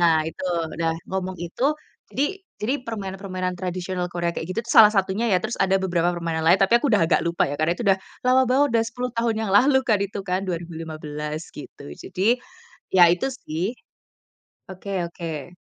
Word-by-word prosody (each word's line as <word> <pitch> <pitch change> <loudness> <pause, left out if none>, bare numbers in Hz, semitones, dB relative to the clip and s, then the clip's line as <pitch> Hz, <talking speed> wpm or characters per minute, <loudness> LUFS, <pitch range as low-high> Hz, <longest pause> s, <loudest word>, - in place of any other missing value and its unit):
nah 170 -2 +5
itu, 165 - -10 0.3
udah 165 0 0 0.2
ngomong 185 0 -2
itu, 175 - -8 0.5
jadi 280 - +1 0.4
jadi 240 +6 0
permainan-permainan 190 -4 -4
tradisional 180 0 -3
Korea 170 0 -2
kayak 165 - -4
gitu 220 +5 -1 0.2
salah 215 -1 +10
satunya 195 +4 +1
ya. 180 - +5
Terus 220 +2 -3
ada 195 0 +2
beberapa 175 -1 +1
permainan 165 -2 -2
lain, 175 - +7
tapi 230 +5 +5
aku 285 - -1
udah 205 - +4
agak 165 - +3
lupa 170 0 +1
ya, 145 - -3
karena 155 +2 +2
itu - - -4
udah, 195 -1 +4 0.3
lama 255 +1 +5
banget, 275 +3 +4
udah - - +3
10 250 +2 -4
tahun 230 -1 +1
yang - - -3
lalu 265 +7 +5
kan 215 -5 +3
itu 200 - -7
kan, 185 0 -1
2015 155 -3 -5
gitu. - - -11
Jadi, 205 - 0 0.6
ya 180 -2 +8
itu 180 +9 -1
sih 185 0 -4 1.0
Oke 190 -1 -4
oke. 170 -1 -7
185 Hz, 180 wpm, -23 LUFS, 170-215 Hz, 1.0 s, salah